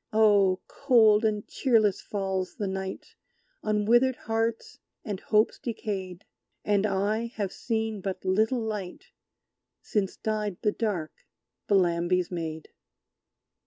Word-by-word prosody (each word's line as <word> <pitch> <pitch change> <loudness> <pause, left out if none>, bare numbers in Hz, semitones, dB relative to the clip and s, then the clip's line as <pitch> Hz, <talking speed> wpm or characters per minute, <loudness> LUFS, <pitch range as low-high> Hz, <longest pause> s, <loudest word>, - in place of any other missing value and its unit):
Oh! 205 -4 +4
cold 230 -6 +4
and 210 -2 0
cheerless 220 -7 +2
falls 190 -2 -3
the 205 - -3
night 190 0 -5 0.5
On 210 -1 0
withered 240 +3 +4
hearts 225 0 -2 0.3
and 205 -5 -3
hopes 215 +1 +2
decayed: 195 -5 -5 0.4
And 205 0 +2
I 210 +4 0
have 200 -3 -2
seen 220 -3 -2
but 190 -1 -5
little 220 +6 +2
light 210 -5 -5 0.7
Since 200 -3 -1
died 210 -4 -2
the 210 - +3
dark 200 -9 -2 0.5
Bellambi's 180 -2 +2
Maid! 160 -2 -5
210 Hz, 115 wpm, -27 LUFS, 190-220 Hz, 0.7 s, Oh